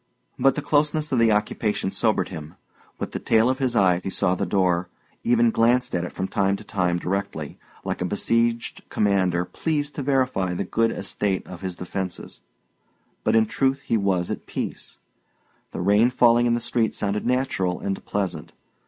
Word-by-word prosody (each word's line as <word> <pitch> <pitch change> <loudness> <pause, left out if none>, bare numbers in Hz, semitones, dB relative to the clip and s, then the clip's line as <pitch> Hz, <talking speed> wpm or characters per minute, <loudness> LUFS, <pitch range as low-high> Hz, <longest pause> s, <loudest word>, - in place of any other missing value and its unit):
But 135 +2 +4
the 150 - -3
closeness 150 +1 +1
of 130 - +2
the 115 -1 +5
occupation 105 -1 0
sobered - - +1
him. 80 +2 -8 0.4
With - - -4
the - - -4
tail 115 +3 +3
of 130 - -3
his 130 -3 0
eye 90 -4 +4
he - - -3
saw 95 -1 +1
the 90 - -2
door 90 -3 +1 0.3
even 120 -1 +3
glanced 125 +3 +2
at 85 - 0
it 90 - -5
from 95 - -3
time 100 0 +1
to 105 - -9
time 90 -4 0
directly, 90 -5 -4 0.3
like - - -3
a - - +1
besieged 115 +4 0
commander 95 -4 +1
pleased 150 - -2
to 145 - -4
verify 130 -10 0
the 95 - -1
good 115 +4 +1
estate 100 -1 -2
of 90 -2 -10
his 95 -2 -4
defences. 90 +1 -6 0.8
But - - +2
in 110 0 +5
truth 135 +4 0
he 125 - -1
was 95 -4 +1
at - - -6
peace. - - -5 0.7
The - - -5
rain 105 +6 +4
falling 120 -1 +4
in 120 - +3
the 120 - -2
street 115 -1 0
sounded 105 0 -1
natural 120 -8 0
and 95 -1 -3
pleasant. 100 -3 -3
105 Hz, 180 wpm, -24 LUFS, 95-120 Hz, 0.8 s, the